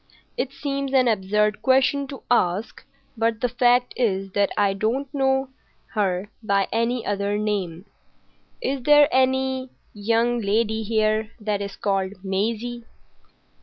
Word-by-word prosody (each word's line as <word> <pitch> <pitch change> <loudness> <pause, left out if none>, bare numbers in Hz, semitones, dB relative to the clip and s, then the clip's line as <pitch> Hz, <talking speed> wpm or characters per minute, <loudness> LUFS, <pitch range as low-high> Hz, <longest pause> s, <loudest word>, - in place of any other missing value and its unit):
"It 255 +1 -2
seems 275 -1 -3
an 255 -1 +5
absurd 210 0 +1
question 265 +1 +3
to 270 0 -9
ask, 200 -1 +1 0.3
but 225 -1 0
the 245 - +1
fact 245 0 +2
is 195 -5 0
that 200 +1 +2
I 200 -1 +3
don't 225 +8 -1
know 265 -1 +1 0.4
her 200 -1 -1
by 200 -3 +1
any 230 +1 0
other 200 0 -1
name: 200 -4 -2 0.8
Is 275 - -1
there 295 +2 +6
any 260 0 +1 0.2
young 230 +3 +1
lady 220 +2 0
here 215 0 +1
that 210 -2 -2
is 200 -1 -5
called 195 -1 -1
Maisie?" 225 +5 -2
225 Hz, 130 wpm, -23 LUFS, 200-255 Hz, 0.8 s, there